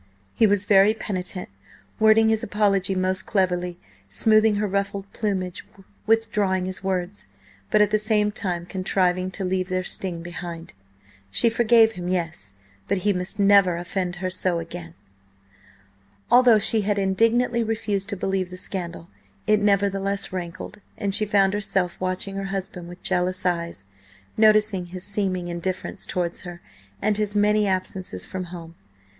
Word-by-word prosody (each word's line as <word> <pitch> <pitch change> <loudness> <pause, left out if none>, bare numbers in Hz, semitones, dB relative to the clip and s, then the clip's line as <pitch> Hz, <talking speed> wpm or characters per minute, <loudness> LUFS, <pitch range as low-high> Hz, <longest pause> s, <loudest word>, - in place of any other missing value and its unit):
He 225 - +4
was 205 -1 +2
very 200 +2 +5
penitent, 185 -3 -4 0.5
wording 220 0 +5
his 220 -1 +1
apology 195 -1 +1
most 185 0 -1
cleverly, 180 -3 0 0.3
smoothing 215 - +3
her 210 +1 0
ruffled 200 0 -2
plumage, 190 -4 -2 0.4
withdrawing 210 -4 +1
his 185 0 -3
words, 190 +1 -3 0.4
but 210 - +5
at 210 - 0
the 215 - +3
same 210 -1 +1
time 180 -5 -3
contriving 185 0 0
to 190 0 -4
leave 185 0 -1
their 185 0 -1
sting 175 -2 -3
behind. 170 -1 -7 0.6
She 230 - +2
forgave 230 -1 +5
him, 180 -4 -6
yes, 165 - -3 0.3
but 200 - +1
he 205 - +4
must 180 +3 -4
never 200 -3 +5
offend 180 +1 -3
her 185 +1 -3
so 185 -1 -1
again. 85 - -7 1.4
Although 245 -2 +7
she 220 +1 +2
had 205 0 0
indignantly 230 +5 +2
refused 215 -3 -2
to 200 - -2
believe 190 -1 -1
the 180 - -9
scandal, 175 -3 -6 0.4
it 215 -1 +3
nevertheless 200 -1 0
rankled, 175 +2 -6 0.2
and 200 -1 -2
she 215 +1 +3
found 195 -1 +3
herself 195 -4 -1
watching 185 +2 -3
her 195 - -3
husband 195 -2 -5
with 175 +1 -12
jealous 185 0 0
eyes, 170 - -2 0.5
noticing 215 -4 +3
his 180 +1 -8
seeming 190 -3 -1
indifference 175 +2 -4
towards 175 -2 -2
her 175 -1 -9 0.4
and 210 0 +2
his 210 -1 -1
many 210 0 +3
absences 185 - -3
from 185 -1 -5
home. 170 -2 -9
190 Hz, 150 wpm, -24 LUFS, 180-210 Hz, 1.4 s, Although